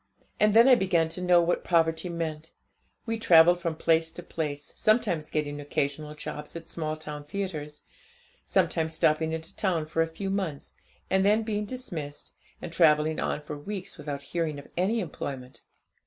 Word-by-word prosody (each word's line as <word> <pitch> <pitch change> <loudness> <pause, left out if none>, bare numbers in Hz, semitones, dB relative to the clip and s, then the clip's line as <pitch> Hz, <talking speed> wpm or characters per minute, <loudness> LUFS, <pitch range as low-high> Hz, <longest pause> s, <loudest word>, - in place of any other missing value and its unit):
And 210 0 +4
then 230 +3 +8
I 265 - +8
began 185 -8 +3
to 170 +3 -4
know 180 -1 +5
what 175 +1 0
poverty 165 0 +2
meant. 160 -2 -4 0.5
We 225 -1 -2
travelled 175 -3 +6
from 165 -2 -2
place 165 0 +2
to 175 - -8
place, 145 -4 -4
sometimes 175 -8 +1
getting 145 -1 -2
occasional 145 +1 -2
jobs 150 +1 -7
at 165 -1 -7
small 155 -2 -3
town 150 -1 -7
theatres, 150 -3 -5 0.6
sometimes 160 0 +1
stopping 160 +1 +2
at 160 0 -6
a - - -9
town 175 -6 0
for 160 +1 0
a 165 - +2
few 195 +4 -4
months, 185 -8 -3 0.4
and 190 0 +3
then 210 +3 +4
being 210 -1 -2
dismissed, 170 - -6 0.3
and 165 - -6
travelling 155 -2 +4
on 150 - -1
for 150 0 -7
weeks 185 +4 -7
without 145 -1 -5
hearing 165 -4 -1
of 140 - -10
any 205 +6 +1
employment. 135 -6 -6
160 Hz, 170 wpm, -28 LUFS, 150-185 Hz, 0.6 s, then